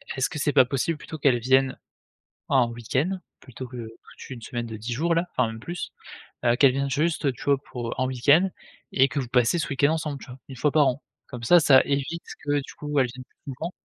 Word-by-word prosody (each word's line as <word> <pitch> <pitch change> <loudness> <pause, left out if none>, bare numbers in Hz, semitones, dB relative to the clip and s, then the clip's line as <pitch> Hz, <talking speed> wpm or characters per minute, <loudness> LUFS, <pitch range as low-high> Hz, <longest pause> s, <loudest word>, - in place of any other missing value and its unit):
est-ce 130 -2 0
que - - -6
c'est 145 -1 0
pas 130 - +6
possible 145 +5 -1
plutôt 155 - -8
qu'elle 135 -4 +3
vienne 130 +2 +2 0.7
en 125 -4 +3
week-end? 135 - -2 0.2
Plutôt 130 0 -9
que 125 - -11
toute 115 +3 -11
1 125 -3 -8
semaine 120 +1 -4
de 110 -1 -7
10 115 +3 -4
jours 170 +6 +1
là, 170 +2 0
enfin 125 -2 +2
même 115 0 -7
plus. 175 +8 -6 0.5
Heu, 120 0 +4
qu'elle 135 -2 +5
vienne 140 +1 -1
juste, 155 +3 0
heu, 135 - +2
tu - - -11
vois 140 -1 +3
pour 120 -2 -4
en 130 - +1
week-end 145 +9 +4 0.4
et 135 0 +4
que 140 +1 -3
vous 125 - -5
passez 125 +7 +2
ce - - -3
week-end 140 +2 +2
ensemble 150 -3 -3
tu - - -12
vois? 125 +1 -10
1 130 - -9
fois 150 +2 +1
par 150 -3 +5
an. 130 +3 -3 0.3
Comme 125 -2 -8
ça 175 +9 +6
ça 140 -4 +6
évite 140 +4 -2 0.2
que 145 0 +1
du 135 - -11
coup 150 -1 -2
elle 130 - +3
vienne 125 +1 -10
plus 135 - -11
souvent. 165 +7 -5
135 Hz, 245 wpm, -25 LUFS, 125-150 Hz, 0.7 s, pas